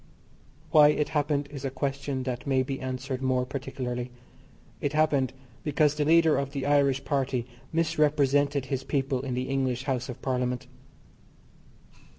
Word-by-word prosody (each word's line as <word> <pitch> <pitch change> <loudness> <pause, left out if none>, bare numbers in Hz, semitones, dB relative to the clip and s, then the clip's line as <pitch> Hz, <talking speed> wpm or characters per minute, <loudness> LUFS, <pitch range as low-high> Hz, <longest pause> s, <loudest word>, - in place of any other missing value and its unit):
Why 150 -3 +8
it 150 0 +1
happened 145 -2 0
is 140 -2 -7
a 135 - -1
question 135 0 -3
that 125 +2 -4
may 130 -1 +3
be 135 0 -4
answered 130 0 -4
more 130 -1 +1
particularly. 125 -2 -4 0.7
It 145 0 -1
happened 150 -4 +2 0.3
because 150 0 +2
the 150 -1 -1
leader 165 0 +5
of 140 0 -4
the 140 -2 -3
Irish 140 -2 +2
Party 135 -4 0 0.3
misrepresented 145 -4 +2
his 135 0 -3
people 135 -2 -1
in 130 -2 -3
the 125 +1 -2
English 130 -2 -1
House 130 -2 -2
of 125 - -6
Parliament. 125 -1 -1
135 Hz, 150 wpm, -27 LUFS, 130-145 Hz, 0.7 s, Why